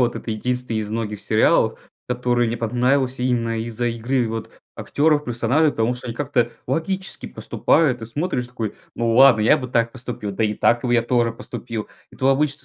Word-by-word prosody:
вот 120 -1 +2
это - - -6
единственный 125 +1 -2
из 105 -1 -3
многих 110 -2 -3
сериалов, 110 0 +2 0.2
который 120 -1 +1
мне 115 +1 -2
понравился 125 +3 0
именно 115 -2 0
из-за 115 +1 -2
игры 120 +1 -1
вот 110 0 -5 0.2
актеров, 150 0 +1
персонажей, 125 +6 +2
потому 115 -2 0
что 125 - -9
они 115 - -4
как-то 130 -5 0 0.2
логически 185 +8 -2
поступают. 135 -7 +1
Ты 115 - -7
смотришь 145 +2 -2
и 120 - -13
такой: 115 -4 -4 0.2
"Hу 120 - -1
ладно, 130 -2 +7
я 110 +8 +5
бы 130 -3 -5
так 115 -1 +1
поступил, 120 -5 -5
да 110 +3 0
и 105 0 0
так 120 +2 +2
бы 120 - +1
я 120 - +4
тоже 120 -1 +1
поступил". 115 -1 -6 0.2
И - - -16
тут 130 - +1
обычно 145 +1 0
120 Hz, 195 wpm, -22 LUFS, 115-130 Hz, 0.2 s, ладно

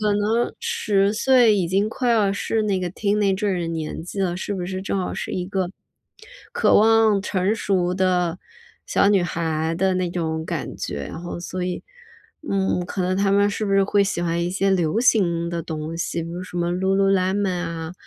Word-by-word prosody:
可 210 -1 +2
能 215 +3 0
10 210 - +1
岁 240 -1 +4
已 185 -3 +1
经 195 +4 +1
快 245 +2 -1
要 210 -4 +3
是 220 +2 -1
那 200 -3 0
个 180 -1 -2
teenager 200 -2 0
的 170 - -2
年 160 -1 -4
纪 195 +3 -5
了， 180 -2 0
是 200 +2 -3
不 180 -2 -3
是 185 +1 -4
正 195 +1 -2
好 185 - -2
是 - - -5
一 180 - -2
个， 190 -1 -2 0.8
渴 475 - +3
望 220 -1 +4
成 195 +1 0
熟 185 -5 0
的， 180 -2 +1 0.5
小 - - +3
女 200 -2 +4
孩 160 -1 -1
的 190 +2 +1
那 185 -1 0
种 160 -2 -2
感 - - -4
觉？ 70 -1 -4
然 - - -7
后 175 0 -6
所 180 +1 -4
以 180 -1 -3 0.7
嗯， 190 -2 0
可 185 - -3
能 185 +1 0
她 195 0 +2
们 200 +1 +3
是 215 - -3
不 200 - -1
是 195 0 +5
会 200 +1 +3
喜 195 -3 -1
欢 170 0 0
一 175 - -1
些 195 +1 +1
流 180 +2 +1
行 175 -8 +2
的 170 -1 -2
东 160 0 -5
西？ 170 0 -2
比 165 - -7
如 175 +2 -5
什 185 -1 -9
么 175 0 0
Lululemon 195 +1 +1
啊， 165 -2 -4
190 Hz, 260 characters per minute, -22 LUFS, 175-205 Hz, 0.8 s, 是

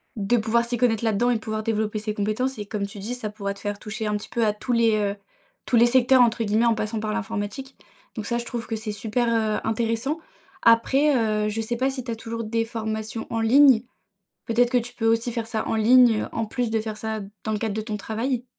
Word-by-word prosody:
de 215 +2 +1
pouvoir 230 +2 +1
s'y 240 +1 -2
connaître 230 -2 +1
là-dedans 225 +2 +2
et 245 - +3
de - - -1
pouvoir 215 0 -3
développer 215 -1 -1
ses 215 0 -4
compétences 215 +6 -1
et 210 - -5
comme 200 -1 -3
tu 200 - -10
dis, 215 +5 -4
ça 245 -4 -4
pourrait 200 -1 -4
te 200 - -15
faire 205 0 -3
toucher 215 +2 -5
un 210 0 0
petit 205 - -9
peu 235 - 0
à 215 - +3
tous 210 +4 -5
les, 230 -2 +3
heu, 205 -1 0 0.5
«tous - - +2
les 235 +1 +7
secteurs» 255 +1 +5
entre 230 -1 +1
guillemets, 215 +2 +2
en 235 - +4
passant 220 0 -3
par 215 0 -2
l'informatique. 220 +6 -4 0.4
Donc 220 -3 -5
ça, 235 +2 -1
je 240 - -6
trouve 235 -1 -5
que 225 - -3
c'est 220 0 -4
super, 220 +3 -1
heu, 220 -2 +1
intéressant. 230 +6 -1 0.5
Après, 270 +6 +4
heu, 215 -3 +1
je 220 +1 -2
sais 235 +2 -3
pas 265 +2 +1
si 260 -1 -5
tu 240 - -9
as - - -2
toujours 230 +1 -5
des 225 +1 -1
formations 220 0 -4
en 230 - -2
ligne? 250 +1 +6 0.6
Peut-être 240 +1 +2
que 250 - +3
tu 245 +1 -6
peux 225 - -2
aussi 230 +1 +2
faire 230 -1 -3
ça 220 -1 -3
en - - 0
ligne, 230 0 +5
heu, - - -3
en 225 - -1
plus 240 +1 -2
de 220 0 +1
faire 215 -1 -5
ça, 220 0 -4 0.2
dans 220 - -1
le 210 - -1
cadre 215 -1 -2
de 220 - -2
ton 215 -1 -4
travail? 230 +4 -2
225 Hz, 255 wpm, -24 LUFS, 215-240 Hz, 0.6 s, les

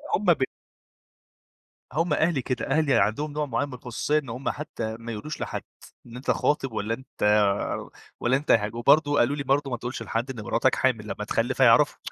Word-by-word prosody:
هُم 205 - -3
ب 170 -7 +4 1.5
هُم 165 +2 +1
أهلي 155 -3 +2
كده، 125 0 -3
أهلي 145 0 +2
عندهم 125 +6 +1
نوع 150 0 -1
معين 135 +2 -1
من 140 - -10
الخصوصية 125 +4 -1
إن 140 -5 -10
هُم 125 +4 -3
حتى 115 -7 -4
ما 115 0 -6
يقولوش 115 +8 -6
لحد، - - -4 0.4
إن 120 - -12
أنت 125 +3 -1
خاطب 135 -4 0
والّا 110 +1 -2
أنت 130 +3 -8 1.0
والّا 130 +2 +2
أنت 145 - -1
ه 105 -2 +4
وبرضه 145 +5 +4
قالوا 130 +5 +3
لي 140 - -3
برضه 140 +1 +1
ما 120 - -1
تقولش 120 +2 -5
لحد 120 +4 -2
إن 115 - -7
مراتك - - +2
حامل، - - +1
لما - - -4
تخلف - - -1
هيعرفوا - - +5
135 Hz, 190 wpm, -26 LUFS, 120-150 Hz, 1.5 s, هيعرفوا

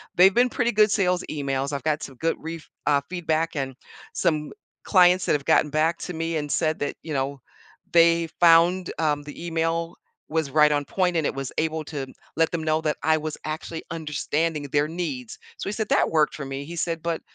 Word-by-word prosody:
"They've 190 +2 +7
been 245 +3 +4
pretty 240 0 0
good 210 0 +4
sales 180 -3 +1
emails, 140 -2 -2
I've 140 - -3
got 155 0 0
some 135 - -8
good 165 +4 0
ref 165 0 -7 0.2
uh, 145 -1 +4
feedback 165 -2 -1
and 135 -2 -3 0.4
some 155 -2 0 0.3
clients 180 -1 +5
that - - +1
have 145 -2 -1
gotten 160 -1 +4
back 160 +3 +2
to 180 - -5
me 165 0 -2
and 145 -1 -3
said 155 -1 +1
that, 145 - -3
you 155 - -5
know, 135 0 -2 0.5
they 170 0 +5
found, 175 +2 +5
um, 150 -2 +1
the 145 +3 -9
email 165 0 -1 0.3
was 155 -3 -1
right 150 +1 +5
on 145 0 0
point 180 +1 0
and 160 - +1
it - - -2
was 135 -1 -4
able 160 0 -1
to 140 -2 -5 0.3
let 165 0 +3
them 165 -2 -2
know 155 0 +1
that 155 -1 -1
I 160 0 +4
was 155 0 -5
actually 160 +1 -5
understanding 155 0 -2
their 145 +1 +2
needs". 150 -9 -5 0.2
So - - -4
he - - -3
said, 215 0 -2
"That - - +3
worked 155 -2 +2
for 150 - -6
me." 135 +1 -5
He 170 +3 -8
said, 165 -1 -2
"But, 170 -1 -2
160 Hz, 210 wpm, -24 LUFS, 150-170 Hz, 0.5 s, They've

